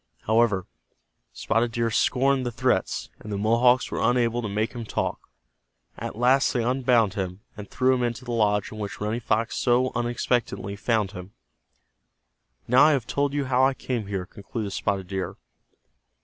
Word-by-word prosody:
However, 110 -4 +2 0.7
Spotted 115 0 0
Deer 115 -1 0
scorned 135 +4 +2
the 120 - -2
threats, - - -1
and 105 - -9
the 100 - -2
Mohawks 120 +4 +3
were - - -2
unable 120 -1 +2
to 110 - -4
make 105 +3 -1
him 120 -2 -5
talk. 110 - -3 0.7
At - - -6
last 130 +3 +3
they 120 -3 0
unbound 120 -4 +2
him, 95 -1 -4
and 105 -3 -9
threw 130 0 +2
him 125 - 0
into 120 +1 -2
the 120 - -5
lodge 105 -3 +1
in 110 - -8
which 100 -1 -5
Running 105 +3 -2
Fox 115 0 0
so 125 +1 +2
unexpectedly 120 -4 -1
found 105 -2 0
him. 90 +2 -10 1.3
"Now 125 +4 +6
I 155 - +5
have 130 -5 -1
told 140 +1 -1
you 145 -1 0
how 130 0 +2
I 135 0 +3
came 120 -6 -3
here," 95 -3 -3
concluded 100 +2 -6
Spotted 95 0 -1
Deer. 95 0 -4
115 Hz, 170 wpm, -25 LUFS, 105-125 Hz, 1.3 s, Now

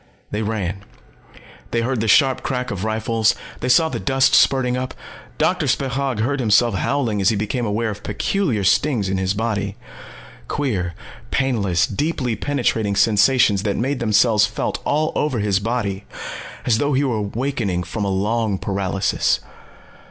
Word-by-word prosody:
They 105 - -2
ran. 100 -3 -3 0.9
They 115 - 0
heard 125 +1 -1
the 110 - -1
sharp 135 +4 +4
crack 125 -1 -3
of 95 -1 -4
rifles. 110 0 +1 0.2
They 125 - -2
saw 160 +6 +5
the - - -4
dust 135 -1 +2
spurting 130 -2 +4
up. 130 0 -4 0.4
Doctor - - +1
Spechaug 135 -3 -1
heard 140 +5 0
himself 115 0 +3
howling 115 -1 0
as 95 - +4
he 110 - +1
became 110 +4 -2
aware 110 +2 -1
of 100 - -8
peculiar 120 - -1
stings 100 +2 +2
in 95 0 -1
his 95 +1 0
body. 105 -2 -2 0.7
Queer, 95 - -2 0.3
painless, 105 -10 +1
deeply 130 0 -2
penetrating 115 -5 0
sensations 105 0 +4
that 100 -1 -1
made 135 +3 -1
themselves 110 -1 +3
felt - - -3
all 155 +2 +1
over 150 -5 0
his 100 -2 +1
body 105 -3 -2 0.6
as 110 -2 +2
though 145 +3 +1
he 135 +2 +2
was 125 -5 0
awakening 105 -4 -2
from 105 +4 -4
a 100 - 0
long 105 +2 0
paralysis. 95 0 0
110 Hz, 155 wpm, -21 LUFS, 100-130 Hz, 0.9 s, saw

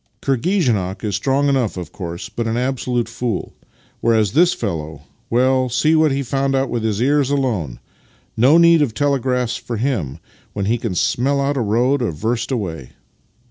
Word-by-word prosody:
" - - -45
Kirghizenok 125 - 0
is 105 -3 -1
strong 135 +5 +1
enough, 130 -8 0
of 90 -3 -6
course, 85 -2 -6
but 115 -1 -4
an 115 +1 -1
absolute 125 -2 -1
fool; 115 -3 -4 0.5
whereas 110 -4 +2
this 175 - +4
fellow 80 -8 -4
— - - -39
well, 130 +1 +2
see 140 +7 +2
what 155 -2 +4
he 140 +1 -1
found 135 +1 0
out 135 0 0
with 120 - -1
his 110 -2 -1
ears 140 +2 +2
alone! 110 - -1 0.6
No 130 +8 +5
need 170 -1 +6
of 120 -7 0
telegraphs 130 -4 0
for 120 - -5
him, 105 - -2 0.4
when 100 -2 -2
he 115 +3 0
can 110 -6 -3
smell 140 +9 +1
out 140 +1 0
a 135 - 0
road 120 +6 +1
a 120 - 0
verst 115 +9 -2
away! 85 - -4
120 Hz, 180 wpm, -19 LUFS, 105-135 Hz, 0.6 s, need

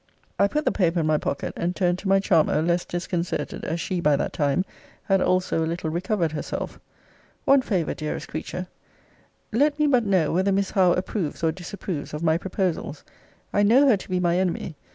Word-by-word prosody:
I 200 - +5
put 300 +9 -2
the - - +3
paper 175 -3 +1
in - - -1
my 155 -1 +2
pocket, 140 - -3
and 175 +1 -2
turned 180 -2 +1
to 195 - -6
my 195 0 +5
charmer, 165 -6 +3
less 175 +1 +1
disconcerted, 175 0 -3
as 165 +2 -2
she, 180 0 -2
by 150 -3 +4
that - - -2
time, 145 +5 +1 0.4
had 195 -1 +2
also 185 -3 +1
a - - -1
little 165 -1 -3
recovered 175 -1 0
herself. 155 - -5 0.7
One 275 0 +6
favour, 185 -10 -1
dearest 155 -1 -4
creature 175 +3 -5 0.9
Let 290 +6 +2
me 300 - +2
but 255 -5 +3
know, 185 -7 +2
whether 190 +3 +2
Miss 195 0 0
Howe 185 -3 +4
approves 180 -4 -3
or 160 - +3
disapproves 175 -3 -6
of 150 - -5
my 160 0 +3
proposals? 180 -5 -2 0.5
I 205 - +3
know 245 +8 +5
her 220 - +5
to 195 - -12
be 185 0 0
my 175 0 +2
enemy. 180 -3 -2
180 Hz, 195 wpm, -24 LUFS, 165-195 Hz, 0.9 s, One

